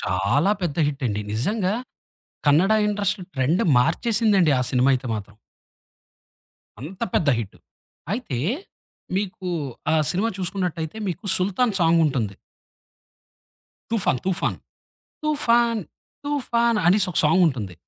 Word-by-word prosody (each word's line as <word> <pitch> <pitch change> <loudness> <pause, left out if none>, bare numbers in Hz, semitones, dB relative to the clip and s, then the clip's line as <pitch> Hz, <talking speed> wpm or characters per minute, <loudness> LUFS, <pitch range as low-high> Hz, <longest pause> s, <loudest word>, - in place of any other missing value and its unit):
చాలా 100 - +1
పెద్ద 165 -5 -2
హిట్ 145 -1 -3
అండి. 105 -1 -2
నిజంగా 190 - 0 0.7
కన్నడ 170 +9 +4
ఇండస్ట్రీ 205 -2 -1
ట్రెండ్ 150 - +1
మార్చేసిందండి 195 - +2
ఆ - - +1
సినిమా 130 +1 +3
అయితే 130 0 -2
మాత్రం. 105 -1 -8 1.5
అంత 180 - -8
పెద్ద 180 -9 +2
హిట్. 110 -4 -6 0.5
అయితే 215 - -3 0.8
మీకు 190 -2 -3 0.4
ఆ - - +4 0.2
సినిమా 200 +6 0
చూసుకున్నట్టైతే 180 -3 -3
మీకు 180 +3 -5
'సుల్తాన్' 200 +4 +1
సాంగుంటుంది. 150 - +2 1.5
'తుఫాన్ 200 - +1
తుఫాన్.' 190 -1 -1 0.7
తుఫాన్ 235 -7 +2 0.4
తుఫాన్ 235 -5 +1
అనేసొక 185 -1 +3
సాంగుంటుంది. 150 - +2
180 Hz, 100 wpm, -23 LUFS, 140-210 Hz, 1.5 s, కన్నడ